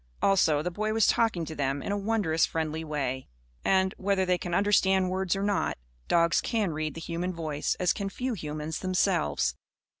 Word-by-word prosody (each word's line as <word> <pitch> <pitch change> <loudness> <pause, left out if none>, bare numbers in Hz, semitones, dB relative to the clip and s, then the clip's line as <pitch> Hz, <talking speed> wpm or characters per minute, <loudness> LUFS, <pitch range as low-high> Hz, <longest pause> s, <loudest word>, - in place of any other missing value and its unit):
Also, 160 -7 +3
the 180 - -2
boy 215 +4 -1
was 225 -1 +3
talking 220 -8 +2
to 160 - -6
them 140 -1 -2
in - - -3
a - - +1
wondrous 200 -6 +1
friendly 160 0 -1
way. 135 -4 -3 0.4
And 190 0 +2
whether 195 -1 +1
they 180 -1 +1
can 175 -1 -3
understand 190 -2 +3
words 190 -1 0
or 195 - -2
not 205 0 0 0.3
dogs 170 0 +3
can 215 -6 0
read 155 0 -3
the - - -5
human 175 +2 -3
voice 155 -3 -2
as 180 -2 +3
can 200 -1 -3
few 250 +5 -3
humans 155 -3 -4
themselves. 185 - +1
180 Hz, 185 wpm, -28 LUFS, 155-195 Hz, 0.4 s, Also